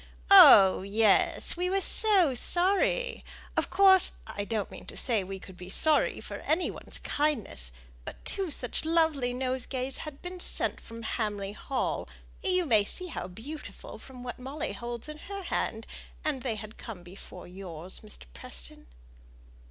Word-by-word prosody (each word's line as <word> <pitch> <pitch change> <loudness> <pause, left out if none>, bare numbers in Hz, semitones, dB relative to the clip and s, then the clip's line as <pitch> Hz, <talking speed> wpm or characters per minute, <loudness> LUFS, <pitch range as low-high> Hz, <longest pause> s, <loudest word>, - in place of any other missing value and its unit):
"Oh, 275 - +9
yes, 205 +1 +2
we 360 +1 -1
were 390 +1 +2
so 385 -7 +3
sorry! 390 - +1 0.3
Of - - 0
course, 380 -1 +7
I 205 - -5
don't 215 -2 -3
mean - - -11
to - - -8
say 225 -6 +1
we 195 +1 -6
could 190 -1 -13
be 180 +1 -9
sorry 310 +9 +2
for - - -6
any 325 +4 0
one's - - -7
kindness; 260 - -2 0.3
but - - -10
two 390 -3 -2
such 250 -5 -1
lovely 320 -6 +2
nosegays 255 +1 -3
had 300 -3 -8
been 360 0 -6
sent - - 0
from 230 0 -10
Hamley 205 -3 -2
Hall 255 +5 -3 0.3
you 365 -2 +2
may 220 -8 +4
see 360 - -6
how - - -5
beautiful 250 +12 -9
from 255 -2 -11
what 245 0 -6
Molly 270 +4 -4
holds 235 +1 -6
in 305 0 -8
her 395 +2 -7
hand 225 -9 -2 0.4
and 295 -4 -1
they 240 -4 -2
had 215 0 -10
come 205 -7 -8
before 180 0 -11
yours, 180 -1 -6
Mr. - - -12
Preston." - - -8
255 Hz, 160 wpm, -29 LUFS, 205-325 Hz, 0.4 s, Oh